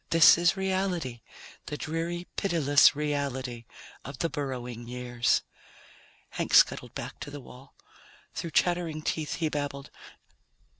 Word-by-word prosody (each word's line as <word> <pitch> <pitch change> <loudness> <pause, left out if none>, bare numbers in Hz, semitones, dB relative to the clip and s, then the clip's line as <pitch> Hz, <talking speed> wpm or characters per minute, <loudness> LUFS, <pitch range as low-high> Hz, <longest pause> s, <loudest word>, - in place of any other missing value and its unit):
This 165 -1 +8
is 175 +2 +2
reality, 185 -10 -1 0.5
the 150 - -4
dreary, 170 +3 -3
pitiless 150 -9 +4
reality 135 -5 -3 0.4
of 140 0 -8
the 165 - -1
Burrowing 125 -5 -5
Years." 120 -1 0 0.9
Hank - - -1
scuttled - - +4
back - - -6
to - - -7
the 145 0 -8
wall. 130 +1 -15 0.6
Through 170 - -4
chattering 165 -2 0
teeth 155 -1 -2
he 160 - -1
babbled 145 -1 -4
145 Hz, 120 wpm, -28 LUFS, 130-170 Hz, 0.9 s, This